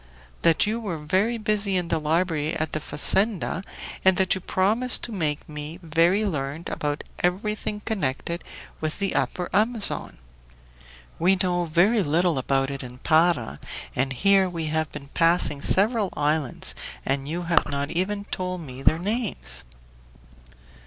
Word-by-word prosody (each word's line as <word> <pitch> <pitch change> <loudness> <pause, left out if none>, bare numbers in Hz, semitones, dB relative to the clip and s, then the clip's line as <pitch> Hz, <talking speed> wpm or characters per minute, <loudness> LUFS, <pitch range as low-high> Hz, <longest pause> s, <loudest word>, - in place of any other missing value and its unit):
"That 165 +3 +4
you 220 +2 -1
were 200 -8 -4
very 190 +10 0
busy 210 -3 0
in 175 -2 -2
the 165 - +1
library 160 0 0
at 155 -1 -2
the 155 - 0
fazenda, 190 +5 0 0.4
and 190 -1 +5
that 190 -1 +3
you 190 - -3
promised 220 +9 +2
to 240 - -3
make 155 -7 -2
me 150 +2 -7
very 170 +6 +2
learned 150 -2 -3
about 145 0 -3 0.2
everything 210 +3 -1
connected 170 -5 -2 0.4
with 155 0 -3
the 200 -1 -1
Upper 180 - -1
Amazon. 220 +1 +2 1.0
We 185 +3 +4
know 180 -2 0
very 180 +8 +3
little 165 -1 +1
about 135 +1 0
it 140 - -5
in 125 -1 -9
Para, 155 - +2 0.4
and 135 +1 0
here 190 +7 +3
we 165 -2 -4
have 160 -1 -1
been 140 -2 -9
passing 165 -4 +3
several 210 - +4
islands 150 -2 +1 0.3
and 135 +1 -1
you 175 +3 -3
have 170 -2 +2
not 140 0 -2
even 200 +4 -1
told 185 -2 -4
me 130 -4 -9
their 155 - +4
names!" 180 - -1
170 Hz, 150 wpm, -25 LUFS, 150-195 Hz, 1.0 s, and